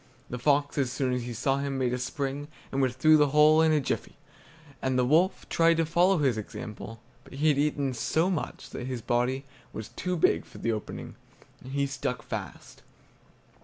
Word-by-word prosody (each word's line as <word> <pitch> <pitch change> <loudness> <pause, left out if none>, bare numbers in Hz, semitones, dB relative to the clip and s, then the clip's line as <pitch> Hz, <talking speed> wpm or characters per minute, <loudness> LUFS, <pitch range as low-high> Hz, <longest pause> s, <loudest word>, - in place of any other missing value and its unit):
The 125 - -4
fox, 145 +2 +2
as 130 -3 +1
soon 130 -1 -1
as 125 - -1
he 120 - -5
saw 135 +4 +1
him, 140 -1 -2
made 125 -2 0
a 125 - -1
spring, 140 +3 -3 0.2
and 135 - 0
was 130 -2 +1
through 155 +4 +6
the 150 -1 +4
hole 150 +2 +5
in 160 -1 +4
a 155 - +4
jiffy; 135 - -3 0.6
and 130 -1 0
the 125 - +3
wolf 165 +8 +2
tried 165 0 +3
to 165 - +2
follow 175 +4 +3
his 135 -7 +1
example, 110 +1 -8 0.2
but - - -15
he 150 +3 +2
had 145 -2 +2
eaten 145 -2 0
so 160 +8 +1
much 180 -5 -4
that 125 - -5
his 125 -3 -4
body 125 +4 0 0.3
was 110 - -7
too 180 0 -3
big - - +3
for - - -15
the 115 - -1
opening, 110 -1 -6 0.5
and 130 - -9
he 140 0 +1
stuck 135 -2 -3
fast. - - -7
140 Hz, 200 wpm, -28 LUFS, 125-155 Hz, 0.6 s, through